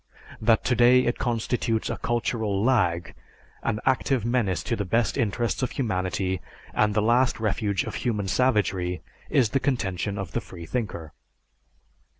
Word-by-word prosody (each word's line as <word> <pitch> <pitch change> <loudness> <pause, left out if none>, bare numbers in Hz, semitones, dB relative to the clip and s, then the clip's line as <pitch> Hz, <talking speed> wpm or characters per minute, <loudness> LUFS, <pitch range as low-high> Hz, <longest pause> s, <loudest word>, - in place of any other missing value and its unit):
That 110 0 +3
today 125 +1 +5
it 120 - -1
constitutes 115 -1 -1
a - - -2
cultural 110 -4 -1
lag, 90 -9 +1 0.5
an 110 -2 -1
active 130 -2 +1
menace 115 -8 0
to 115 - -1
the 105 - -2
best 115 +3 +1
interests 115 -1 0
of 130 - 0
humanity 95 - -1 0.3
and 105 -1 +2
the 105 - +2
last 120 +3 +3
refuge 100 -2 0
of - - -6
human 105 -6 -1
savagery, 95 -7 +1 0.3
is 130 -7 +3
the 135 - +1
contention 100 -7 -1
of 95 -4 -5
the - - -1
freethinker. 85 -3 -5
110 Hz, 145 wpm, -26 LUFS, 95-120 Hz, 0.5 s, today